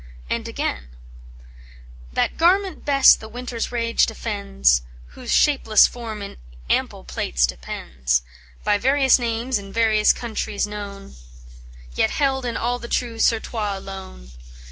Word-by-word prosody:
And - - -2
again: 65 0 -3 1.2
"That - - 0
garment 375 +3 +2
best 275 -2 +6
the 220 - -10
winter's 245 0 -5
rage 230 -1 +2
defends 65 0 +1 0.3
Whose - - -7
shapeless 245 -7 +5
form 225 -4 -5
in - - -9 0.3
ample - - 0
plaits 60 0 0
depends; 60 +1 -2 0.4
By 205 - +2
various 265 +2 +4
names 235 0 -1
in 195 -1 -10
various 220 -1 +3
countries 220 -3 -3
known, 200 - -8 0.8
Yet - - +2
held 265 -3 0
in 235 - -2
all 245 +1 -1
the 235 - -8
true 235 -2 -2
surtout 220 -3 0
alone. 190 - -10
220 Hz, 125 wpm, -22 LUFS, -, 1.2 s, best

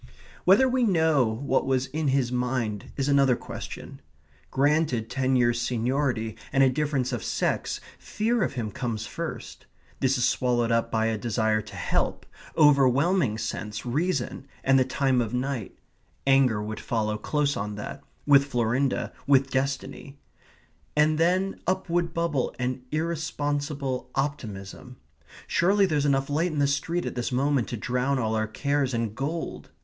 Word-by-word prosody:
Whether 200 +9 +6
we 255 0 +1
know 160 - +3
what 130 +5 0
was 130 -1 +1
in 155 +2 -2
his 130 -2 +1
mind 125 -4 -2
is 135 -1 0
another 140 -3 +4
question. 120 - -8 0.5
Granted 140 -5 +1
ten 130 -1 +1
years' 120 -1 +2
seniority 120 -1 -1 0.2
and 135 -1 +4
a 130 - +5
difference 135 -2 -1
of 115 -6 -3
sex, - - -1 0.2
fear 225 +2 -1
of 170 - 0
him 115 -5 -3
comes 115 -1 -3
first; - - -7 0.3
this 135 0 +2
is 125 - +2
swallowed 120 -2 +1
up 115 0 +1
by 110 0 +1
a 110 -1 0
desire 110 -2 +1
to 105 - -12
help - - -1 0.3
overwhelming 140 - +4
sense, 105 0 -4
reason, 140 0 -1 0.2
and 135 0 +4
the - - +5
time 135 -1 +1
of 115 +1 -2
night; 125 -4 -3 0.5
anger 135 -6 +4
would 110 +1 -5
follow 110 -2 -1
close 145 +6 0
on 105 +1 -3
that 105 - -7 0.2
with 140 -1 +6
Florinda, 125 +1 0
with 135 -1 +4
destiny; 135 +1 -3 0.8
and 155 +1 +3
then 185 +4 +1
up 185 0 0
would 170 -1 +1
bubble 170 -6 -1
an 125 0 -2
irresponsible 145 -4 -2
optimism. 125 -4 -4 0.5
"Surely 195 +4 +3
there's 150 -5 +1
enough 135 -1 +2
light 160 +5 0
in 155 - -4
the 145 - +3
street 145 +5 -1
at - - -3
this 120 0 -3
moment 135 -1 +1
to 120 - -4
drown 125 +4 0
all 110 -3 0
our 110 -1 0
cares 140 +3 0
in 115 -2 -1
gold!" 150 +7 -4
135 Hz, 155 wpm, -26 LUFS, 120-145 Hz, 0.8 s, Whether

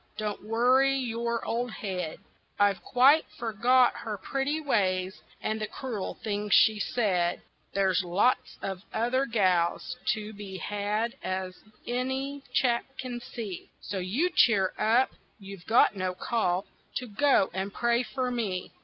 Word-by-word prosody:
Don't 210 -2 -3
worry 250 +5 +3
your 235 -2 -2
old 240 +2 -1
head, 185 -7 -4 0.4
I've 200 -2 +3
quite 275 +5 +5
forgot 240 +3 +3
her 215 -2 -5
pretty 270 +9 -2
ways 190 -9 0 0.2
and 215 0 -2
the 215 - -1
cruel 230 -7 -5
things 210 -1 +1
she 215 -1 +5
said, 185 -6 0 0.3
There's 190 -1 +2
lots 195 +8 +1
of 190 -2 -4
other 250 +5 +1
gals 185 +1 +1 0.2
to 215 0 -6
be 200 -2 -8
had 210 +5 -2
as 185 0 -3 0.3
any 265 +3 -2
chap 240 -2 +2
can 245 -2 -5
see, 215 -6 -7
So 195 0 -4
you 240 - 0
cheer 200 - +4
up, 235 +5 +3 0.3
you've 195 -3 -11
got 225 -1 +5
no 185 -1 -2
call 185 -4 0 0.3
to 250 - -2
go 235 -1 +3
and 190 +2 -3
pray 235 +3 +1
for 255 0 -2
me. 205 -7 -2
220 Hz, 140 wpm, -28 LUFS, 195-245 Hz, 0.4 s, quite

